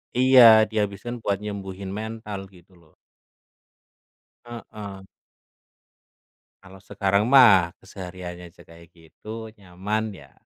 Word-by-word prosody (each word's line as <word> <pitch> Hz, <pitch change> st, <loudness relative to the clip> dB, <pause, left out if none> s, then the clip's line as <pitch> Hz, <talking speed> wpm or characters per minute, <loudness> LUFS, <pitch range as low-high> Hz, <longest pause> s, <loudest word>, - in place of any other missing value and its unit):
iya, 125 Hz, -4 st, +7 dB
dihabiskan 105 Hz, +2 st, -3 dB
buat 100 Hz, -1 st, 0 dB
nyembuhin 100 Hz, -2 st, -7 dB
mental, 105 Hz, -2 st, -7 dB
gitu 90 Hz, 0 st, -21 dB
lho. 80 Hz, -2 st, -26 dB, 1.5 s
Heeh. 105 Hz, -4 st, -10 dB, 1.6 s
Kalau 95 Hz, 0 st, -15 dB
sekarang 100 Hz, +2 st, -1 dB
mah 105 Hz, -10 st, +5 dB
kesehariannya 90 Hz, -2 st, -10 dB
aja -, -, -20 dB
kayak 85 Hz, 0 st, -17 dB
gitu, 110 Hz, +7 st, -10 dB
nyaman, 100 Hz, +3 st, -4 dB
ya, 70 Hz, -6 st, -16 dB
100 Hz, 100 wpm, -23 LUFS, 90-110 Hz, 1.6 s, iya